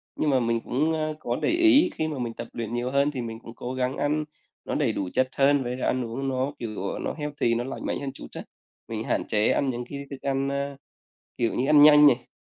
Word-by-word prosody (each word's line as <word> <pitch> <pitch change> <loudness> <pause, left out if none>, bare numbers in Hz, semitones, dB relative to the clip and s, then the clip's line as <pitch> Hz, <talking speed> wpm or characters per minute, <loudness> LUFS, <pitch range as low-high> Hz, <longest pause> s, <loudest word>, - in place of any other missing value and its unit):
Nhưng 155 - 0
mà 130 -2 +3
mình 115 -1 +1
cũng, 150 +8 0
ơ, 155 -1 -1
có 120 - -2
để - - +1
ý 335 -1 +5
khi 155 - -2
mà 150 - -4
mình 120 -2 -3
tập 115 - -7
luyện 115 -1 -4
nhiều 120 +1 -2
hơn 140 +2 +2
thì 130 -4 -4
mình 115 -1 -6
cũng 115 0 -12
cố 125 +2 -5
gắng 130 +1 -1
ăn 150 +1 0 0.4
nó - - -3
đầy - - +1
đủ 95 - -3
chất 130 - +2
hơn, 140 0 +4
với 125 0 -3
cả - - +1
ăn 130 -1 0
uống 125 +4 -4
nó 130 +1 -1
kiểu, 110 -5 -5
ờ, - - -4
nó - - -3
healthy, 145 -5 -1
nó 120 - -1
lành 135 +2 -6
mạnh - - -2
hơn 140 -1 -4
chút - - -10
á. - - -4 0.5
Mình - - -4
hạn - - 0
chế 105 0 +2
ăn 140 - +1
những 120 -1 -3
cái 140 0 -6
thức 135 -2 -8
ăn, 135 0 0
ơ, 140 0 -3 0.6
kiểu 115 -1 0
như 130 - 0
ăn 150 -1 +6
nhanh 150 0 +9
này, 125 -3 +2
135 Hz, 265 wpm, -26 LUFS, 120-145 Hz, 0.6 s, nhanh